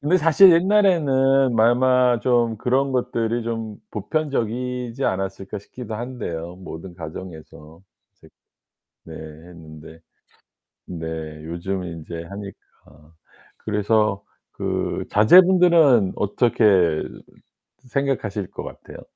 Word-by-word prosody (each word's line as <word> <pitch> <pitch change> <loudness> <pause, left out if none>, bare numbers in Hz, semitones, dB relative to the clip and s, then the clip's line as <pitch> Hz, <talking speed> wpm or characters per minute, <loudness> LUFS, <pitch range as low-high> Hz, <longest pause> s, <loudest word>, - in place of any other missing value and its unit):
근데 155 +6 +2
사실 165 +3 +6
옛날에는 140 - +3
아마 125 +1 +3
좀 120 -3 +1
그런 130 +3 0
것들이 120 -2 -1
좀 115 -2 -5
보편적이지 125 -3 -3
않았을까 95 +1 -3
싶기도 110 +2 -9
한데요 95 -8 -6
모든 90 -1 -10
가정에서. 80 -1 -11 0.3
색 - - -21 0.8
네 80 - -11
했는데 80 0 -12 0.9
네 80 -2 -7 0.4
요즘 90 +3 -4
인제 85 0 -8
하니까 90 -5 -13 0.4
그래서 105 -1 0 0.3
그 - - -3
자제분들은 170 - +5
어떻게 100 -6 +2 0.9
생각하실 115 -8 -2
것 - - -8
같아요? - - -11
110 Hz, 220 characters per minute, -22 LUFS, 90-130 Hz, 0.9 s, 사실